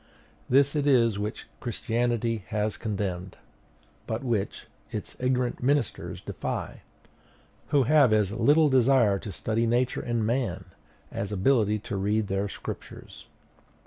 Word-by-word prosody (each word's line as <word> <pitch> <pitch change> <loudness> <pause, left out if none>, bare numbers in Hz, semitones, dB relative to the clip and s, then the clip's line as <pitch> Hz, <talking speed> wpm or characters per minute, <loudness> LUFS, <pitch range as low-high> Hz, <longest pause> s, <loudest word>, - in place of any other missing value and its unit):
This 140 +3 +4
it 145 -1 +1
is 115 -6 +4
which 105 +1 -4
Christianity 115 -1 -1
has 105 0 -1
condemned, 95 -4 -4 0.7
but 110 +3 -3
which 115 -6 -2 0.3
its - - -6
ignorant 125 -1 0
ministers 140 -2 0
deify; - - -4 0.9
who 140 -2 +3
have 140 -1 +5
as 105 -3 +2
little 145 +8 +4
desire 130 -6 +4
to 100 - -7
study 110 +5 -1
Nature 120 +2 +1
and 120 -2 -1
man, 120 +2 -1 0.5
as 100 - -4
ability 105 +1 +2
to 105 0 -5
read 105 +2 0
their 100 +1 -1
Scriptures. - - -9
115 Hz, 125 wpm, -27 LUFS, 105-130 Hz, 0.9 s, have